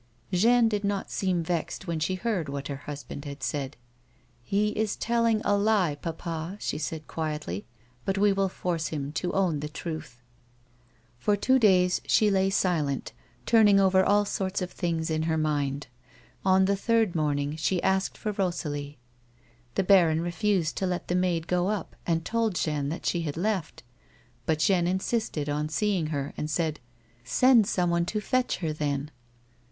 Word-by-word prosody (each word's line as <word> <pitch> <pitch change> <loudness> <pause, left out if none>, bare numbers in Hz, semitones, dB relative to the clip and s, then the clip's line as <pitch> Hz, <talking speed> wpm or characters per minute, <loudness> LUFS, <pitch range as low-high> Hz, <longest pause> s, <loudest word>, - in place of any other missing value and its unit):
Jeanne 230 +5 +5
did 210 -2 -1
not 200 -1 -2
seem 185 -3 0
vexed 170 +2 -3
when 170 -3 -2
she 155 +5 0
heard 185 -6 -2
what 140 0 -5
her 140 - -3
husband 145 -1 -7
had 140 -2 -8
said. 135 +1 -3 0.4
" - - -35 0.3
He 205 - +1
is 215 0 -1
telling 230 -2 +1
a 205 - +3
lie, 200 -6 +2
papa," 165 +3 -5
she 150 - -3
said, 155 0 -4
quietly; 150 - -4 0.2
" 125 0 -34
but 195 0 -1
we 205 0 +4
will 195 -1 +1
force 170 -3 -2
him 145 -2 -4
to 170 +3 -2
own 180 -6 +1
the 150 +1 -4
truth." 155 -6 -6 1.0
For 205 +11 +2
two 260 +6 +3
days 180 -5 +4
she 210 -1 +4
lay 190 0 +2
silent, 160 - 0 0.3
turning 210 -4 +6
over 190 -1 +4
all 205 +2 +3
sorts 190 -1 -2
of 180 -1 -4
things 165 -3 -2
in 155 0 0
her 160 - +1
mind; 145 -3 -1 0.6
on 190 0 +4
the 200 +1 +2
third 225 -1 +2
morning 145 -2 0
she 165 +4 0
asked 190 0 +1
for 215 - -2
Rosalie. 150 -7 -3 0.8
The 195 - +2
baron 175 -5 +5
refused 175 -1 0
to 190 - 0
let 180 -1 -3
the - - +1
maid 180 -3 +1
go 180 +1 +1
up 210 -5 -3
and 165 -1 0
told 225 -4 0
Jeanne 150 -4 -1
that 165 - -5
she 175 - +1
had 155 -2 -4
left. 190 -3 -2 0.6
But 160 - +2
Jeanne 175 +1 +2
insisted 190 -4 -1
on 150 +1 -1
seeing 190 -1 0
her, 145 -2 -3
and 150 - -3
said: 155 -1 -1 0.3
" 120 +1 -34
Send 230 - +4
someone 170 -1 +1
to 210 +4 -1
fetch 255 +4 0
her 155 - 0
then. 145 -1 -2
175 Hz, 175 wpm, -27 LUFS, 155-200 Hz, 1.0 s, turning